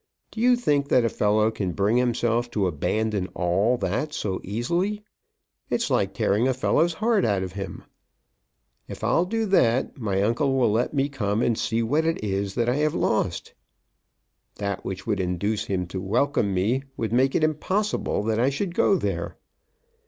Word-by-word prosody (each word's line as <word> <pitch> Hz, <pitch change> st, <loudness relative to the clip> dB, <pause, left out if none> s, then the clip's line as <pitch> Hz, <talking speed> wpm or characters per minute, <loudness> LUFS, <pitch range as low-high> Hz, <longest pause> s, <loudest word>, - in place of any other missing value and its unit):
Do 220 Hz, -, -5 dB
you 250 Hz, +1 st, +5 dB
think 145 Hz, -12 st, 0 dB
that 125 Hz, -, +4 dB
a -, -, +2 dB
fellow 105 Hz, +1 st, +2 dB
can 100 Hz, -5 st, -3 dB
bring 105 Hz, +5 st, +1 dB
himself 120 Hz, -1 st, +1 dB
to 100 Hz, -, +2 dB
abandon 100 Hz, +4 st, -1 dB
all 95 Hz, +8 st, +1 dB
that 120 Hz, +10 st, -2 dB
so 95 Hz, -3 st, -3 dB
easily? 175 Hz, -, -2 dB, 0.7 s
It's -, -, -1 dB
like -, -, +1 dB
tearing 105 Hz, +6 st, +2 dB
a 130 Hz, -, +1 dB
fellow's 165 Hz, +5 st, +2 dB
heart 215 Hz, +4 st, +1 dB
out 100 Hz, -3 st, +1 dB
of 95 Hz, -, -5 dB
him. 95 Hz, -1 st, -6 dB, 1.0 s
If -, -, -9 dB
I'll 170 Hz, -, +2 dB
do 225 Hz, +4 st, -1 dB
that, 130 Hz, -, +2 dB
my 100 Hz, -4 st, 0 dB
uncle 135 Hz, +5 st, +1 dB
will 120 Hz, -5 st, +3 dB
let 120 Hz, +7 st, 0 dB
me 140 Hz, 0 st, +2 dB
come 110 Hz, -5 st, -1 dB
and 115 Hz, -, +2 dB
see 115 Hz, +1 st, -1 dB
what 145 Hz, +8 st, +1 dB
it 165 Hz, -8 st, -1 dB
is 100 Hz, -1 st, -2 dB
that 120 Hz, -1 st, 0 dB
I 125 Hz, +3 st, +1 dB
have 150 Hz, 0 st, +1 dB
lost! -, -, -1 dB, 1.0 s
That 100 Hz, -2 st, -3 dB
which 95 Hz, 0 st, -5 dB
would 105 Hz, -3 st, -1 dB
induce 95 Hz, +4 st, -1 dB
him 90 Hz, -2 st, -2 dB
to 95 Hz, 0 st, -4 dB
welcome 110 Hz, +2 st, +1 dB
me 105 Hz, +8 st, +1 dB, 0.2 s
would 110 Hz, -1 st, -2 dB
make 130 Hz, +2 st, +2 dB
it -, -, +2 dB
impossible 170 Hz, -, 0 dB
that 110 Hz, 0 st, 0 dB
I 125 Hz, +3 st, +3 dB
should 170 Hz, +6 st, -3 dB
go 195 Hz, -, +3 dB
there. -, -, -3 dB
115 Hz, 180 wpm, -25 LUFS, 100-145 Hz, 1.0 s, you